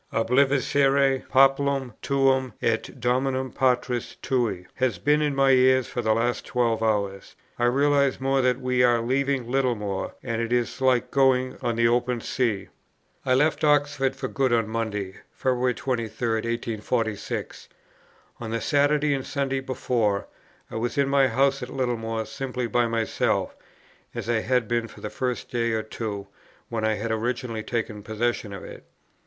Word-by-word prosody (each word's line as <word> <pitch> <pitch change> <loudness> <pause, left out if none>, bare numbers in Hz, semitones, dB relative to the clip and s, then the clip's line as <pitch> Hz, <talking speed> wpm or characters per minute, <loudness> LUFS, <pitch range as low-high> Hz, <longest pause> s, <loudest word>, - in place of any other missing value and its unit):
'Obliviscere 135 +2 +2
populum 135 -1 +3
tuum 135 -3 +2
et 115 -1 0
domum 130 +2 0
patris 125 -2 0
tui,' 115 -9 0
has 125 -6 0
been 150 +11 +2
in 145 -2 0
my 135 0 +4
ears 130 0 +5
for 120 - -3
the 110 -1 +2
last 120 +2 0
twelve 115 -2 0
hours. 100 -3 -1 0.2
I 120 - +2
realize 140 +2 +2
more 135 0 +1
that 125 0 +1
we 125 -1 +1
are 120 -1 +4
leaving 130 +1 0
Littlemore, 120 -7 -1
and 115 -3 -2
it 115 0 -3
is 120 +2 0
like 130 -2 +2
going 130 -2 +3
on 120 -3 -1
the 115 0 +3
open 120 +1 +1
sea." 110 -5 -1 0.6
I 130 - +4
left 150 +4 +2
Oxford 145 -3 +2
for - - -4
good 135 -2 0
on 115 -2 +2
Monday, 105 -4 -3 0.2
February 125 -1 0
23, 125 -3 -2 0.3
1846. 115 -1 -3 0.7
On 115 - -5
the 115 +1 -1
Saturday 145 +1 +2
and 135 -1 -2
Sunday 135 -1 -2
before, 120 -6 -1 0.5
I - - -4
was 120 +5 -2
in 140 -1 +2
my 140 -1 +4
house 135 +3 +1
at 125 - -5
Littlemore 115 -4 -2
simply 135 -2 -4
by 120 0 +1
myself, 115 -1 0 0.6
as 120 -3 -5
I 120 -1 +2
had 125 0 0
been 120 0 0
for - - -14
the - - -6
first 125 -2 -3
day 115 -1 0
or 110 -1 -1
two 105 -2 -5 0.4
when 115 -2 -3
I 110 0 +2
had 110 +2 -3
originally 115 0 -2
taken 110 -2 -3
possession 110 +1 -2
of 100 - -7
it. - - -10
125 Hz, 160 wpm, -25 LUFS, 115-135 Hz, 0.7 s, ears